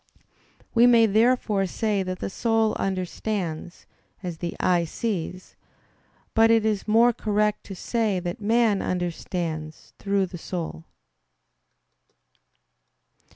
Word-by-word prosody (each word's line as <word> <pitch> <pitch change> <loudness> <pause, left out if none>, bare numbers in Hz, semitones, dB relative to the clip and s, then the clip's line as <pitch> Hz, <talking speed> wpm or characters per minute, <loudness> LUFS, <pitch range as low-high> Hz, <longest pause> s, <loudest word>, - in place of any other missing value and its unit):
We 235 +1 +6
may 235 -2 +6
therefore 215 -2 +2
say 210 +1 -1
that 185 -1 -3
the - - -4
soul 225 0 +1
understands, 185 -2 -3 0.4
as 175 -3 -5
the 170 -1 -4
eye 180 -2 +2
sees; 185 0 -4 0.8
but 225 0 +5
it 225 -1 +4
is 215 -2 -1
more 230 +3 +5
correct 210 -1 0
to 195 - -8
say 215 0 0
that 175 +3 -5
man 220 -1 +2
understands 170 -3 -4
through 200 -1 +1
the 175 -1 -9
soul. 160 - -5
195 Hz, 110 wpm, -25 LUFS, 175-225 Hz, 0.8 s, We